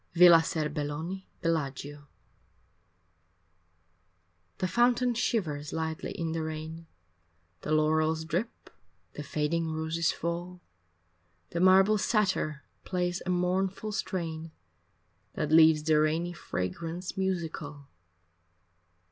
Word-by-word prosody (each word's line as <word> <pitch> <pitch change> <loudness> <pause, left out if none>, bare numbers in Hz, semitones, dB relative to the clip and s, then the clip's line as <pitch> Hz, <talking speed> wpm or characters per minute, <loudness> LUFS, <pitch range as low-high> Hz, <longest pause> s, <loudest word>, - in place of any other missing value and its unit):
IX 170 - -6
Villa 175 -2 +10
Serbelloni, 155 +3 -3 0.2
Bellaggio 145 -3 -2 2.5
The 185 - -1
fountain 240 +3 +3
shivers 155 -11 -1
lightly 160 +2 -3
in 165 -4 -3
the 165 0 -2
rain, 160 +1 -6 0.7
The - - -5
laurels 155 +1 +2
drip, 180 +8 -4 0.4
the - - -6
fading 155 +3 -1
roses 160 +1 0
fall, 175 +2 -4 0.9
The 170 - -2
marble 190 +3 +5
satyr 190 -10 0 0.2
plays 180 0 -2
a - - -1
mournful 185 +3 0
strain 165 -5 -3 0.8
That 150 0 -2
leaves 160 -1 +6
the 155 -1 +3
rainy 160 +3 +1
fragrance 165 - -4
musical. 160 -6 -3
165 Hz, 95 wpm, -29 LUFS, 155-180 Hz, 2.5 s, Villa